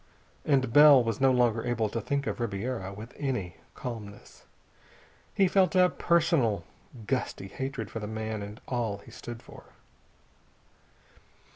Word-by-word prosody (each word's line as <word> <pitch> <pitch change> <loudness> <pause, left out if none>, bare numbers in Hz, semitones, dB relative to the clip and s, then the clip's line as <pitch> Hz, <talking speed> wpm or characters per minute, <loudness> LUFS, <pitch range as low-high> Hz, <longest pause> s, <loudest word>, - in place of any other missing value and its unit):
And 130 -5 +2
Bell 145 -3 +8
was 115 +1 -2
no 135 -1 +5
longer 120 -3 +2
able 120 -3 0
to 115 - -3
think 140 +4 -1
of - - -3
Ribiera 110 -2 -3
with 105 +4 -10
any 120 - -3 0.2
calmness. 110 -5 -8 0.9
He 195 - +4
felt 190 0 +3
a 180 -1 +6
personal, 155 - +2 0.4
gusty 125 -5 -2
hatred 130 -4 -5
for 115 - -4
the 105 - -5
man 110 0 -4
and 105 +3 -8
all 115 -5 -1
he - - -15
stood 120 -1 -9
for. - - -14
120 Hz, 140 wpm, -28 LUFS, 110-135 Hz, 0.9 s, Bell